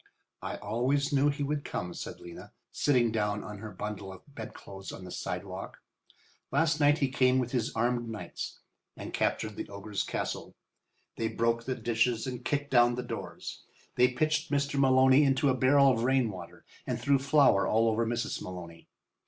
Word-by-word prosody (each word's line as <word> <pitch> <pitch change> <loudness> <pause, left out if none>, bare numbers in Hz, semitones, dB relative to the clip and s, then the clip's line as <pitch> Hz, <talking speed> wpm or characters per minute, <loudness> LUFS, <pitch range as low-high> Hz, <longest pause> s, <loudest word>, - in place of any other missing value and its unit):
"I - - -4
always 140 +5 0
knew 140 +1 +4
he 145 0 -2
would 145 0 -1
come," 90 0 -4
said - - -7
Lena, 85 -1 -11 0.2
sitting 125 -5 +2
down 105 -2 -1
on 105 -1 -8
her 110 +1 -7
bundle 100 0 -6
of 95 - -12
bedclothes 100 -4 -8
on 95 - -9
the 90 - -9
sidewalk. - - -5 0.7
"Last 160 +3 +2
night 145 0 +5
he 140 -4 +1
came 130 -1 +3
with 125 -2 -1
his 120 -3 0
armed 120 +1 0
knights 110 -2 -6 0.4
and - - -7
captured 110 -2 -1
the - - -5
ogre's 100 0 -4
castle. - - -4 0.6
They 115 - 0
broke 115 +1 0
the 130 - -1
dishes 115 0 0
and 125 -2 -5
kicked 145 +1 -1
down 120 -1 +5
the 125 - -3
doors. 120 - -6 0.3
They 125 - +5
pitched 155 +5 0
Mr. 140 0 0
Maloney 130 +1 +6
into 135 0 +3
a - - +4
barrel 135 +2 +5
of 115 -3 0
rain 130 -3 +2
water 90 -3 -10 0.2
and - - -1
threw 140 -1 +3
flour 140 -7 +4
all 115 +1 +3
over 115 +1 +2
Mrs. 115 +1 -2
Maloney. 85 -2 -8
120 Hz, 175 wpm, -30 LUFS, 110-140 Hz, 0.7 s, Maloney